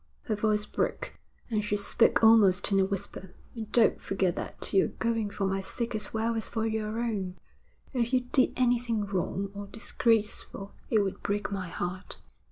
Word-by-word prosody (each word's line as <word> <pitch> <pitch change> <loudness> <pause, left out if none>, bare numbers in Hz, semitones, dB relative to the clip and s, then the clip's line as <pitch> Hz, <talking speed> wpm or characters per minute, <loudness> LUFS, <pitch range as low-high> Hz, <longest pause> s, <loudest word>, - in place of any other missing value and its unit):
Her 220 - -1
voice 210 0 +1
broke, - - -3 0.3
and 215 -1 +1
she 210 0 0
spoke 200 +2 +3
almost 210 -4 +6
in 195 - +4
a 190 - +4
whisper. 190 -1 -5 0.2
'And 220 -3 -7
don't 235 -2 +4
forget 190 -2 0
that - - -2
you're 195 - +4
going 225 -2 -1
for 200 0 -2
my 195 0 0
sake 235 +5 -4
as 215 -2 -3
well 225 +1 0
as 225 -1 -2
for 225 -1 -1
your 220 0 -2
own. 200 -6 -2 0.6
If 240 -2 0
you 255 -1 +3
did 250 +1 +2
anything 240 -4 +1
wrong 195 0 -2
or 200 0 -7
disgraceful 215 -2 -1 0.2
it 220 -3 +4
would 195 - -4
break 205 0 -2
my 190 -2 -3
heart.' 180 +2 -4
210 Hz, 175 wpm, -29 LUFS, 195-225 Hz, 0.6 s, almost